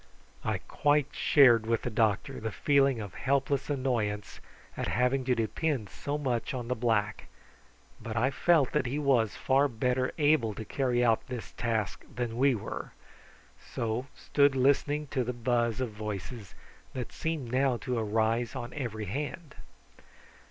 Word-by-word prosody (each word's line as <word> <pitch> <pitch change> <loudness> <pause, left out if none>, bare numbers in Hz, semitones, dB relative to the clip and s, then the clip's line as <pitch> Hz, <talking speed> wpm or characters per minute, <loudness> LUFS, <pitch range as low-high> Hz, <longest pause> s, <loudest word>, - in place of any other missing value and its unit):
I - - 0
quite 145 -1 +2
shared 120 -6 +5
with 115 -1 0
the 120 - -2
doctor 110 -2 0
the 110 0 -3
feeling 140 -4 +3
of 100 -4 -6
helpless 140 +1 0
annoyance 115 -7 -1 0.4
at - - -3
having 125 +3 +1
to 125 -1 +2
depend 115 0 -1
so 145 +1 -3
much 130 -3 -2
on 120 -1 -5
the 125 - +1
black; 110 -3 0 0.7
but 115 0 -5
I 130 +4 +2
felt 155 -2 +3
that 130 - 0
he 135 +4 -2
was 130 -7 +2
far 135 +2 +3
better 125 +1 0
able 145 -8 +3
to 110 - -6
carry 125 +1 +1
out 115 -2 +2
this 125 -3 -6
task 110 -4 -2
than 120 -1 -2
we 135 0 +4
were, 105 - -6 0.8
so 115 +3 -2
stood 140 -1 +2
listening 145 +3 +2
to 130 -3 0
the 125 +1 -3
buzz 120 -1 0
of 125 -3 -2
voices, 105 0 -6 0.4
that 125 -2 -5
seemed 160 -7 -3
now 130 -1 +2
to 120 +2 -2
arise 110 +2 0
on 120 - -5
every 115 -7 -4
hand. 145 - -5
125 Hz, 155 wpm, -29 LUFS, 110-135 Hz, 0.8 s, shared